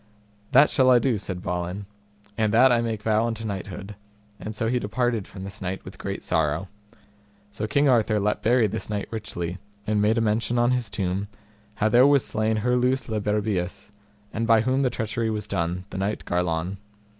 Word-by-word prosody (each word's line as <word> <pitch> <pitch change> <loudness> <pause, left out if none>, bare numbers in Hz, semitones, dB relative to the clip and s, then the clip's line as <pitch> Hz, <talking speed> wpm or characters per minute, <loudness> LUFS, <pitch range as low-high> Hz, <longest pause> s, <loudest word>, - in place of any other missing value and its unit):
That 140 +4 +6
shall 130 -2 +4
I 125 - +7
do, 120 -3 +1
said 95 -2 -5
Balin, 90 +3 -3 0.5
and 110 -1 +1
that 125 +4 +6
I 120 -1 +3
make 110 -2 -3
vow 110 +1 +2
unto 115 -1 -4
knighthood; 100 0 -5 0.5
and 110 - -6
so 115 +1 -1
he 125 +2 +1
departed 115 -1 -1
from 95 -2 -9
this 100 +1 -8
knight 95 0 -4
with - - -11
great - - -4
sorrow. 80 +4 0 0.8
So 105 +1 -4
King 140 +6 +2
Arthur 115 -4 +3
let 105 +1 0
bury 120 0 +3
this 110 +2 -3
knight 105 -1 -2
richly, 90 -5 -4 0.3
and 105 -1 +1
made 110 +3 +3
a - - +2
mention 115 +2 +1
on 120 +1 +3
his 125 -4 0
tomb, 95 +1 -2 0.5
how 110 - +1
there 120 +5 +6
was 140 -2 +4
slain 110 0 0
Herlews 125 +1 +1
le 110 -1 -1
Berbeus, 105 -3 -2 0.4
and 115 0 -1
by 115 -2 +5
whom 130 +4 +1
the 130 - +2
treachery 115 -1 -2
was 105 -2 -2
done, 90 -2 -2
the - - -4
knight 100 +2 -2
Garlon. 90 +2 -1
110 Hz, 190 wpm, -25 LUFS, 100-120 Hz, 0.8 s, I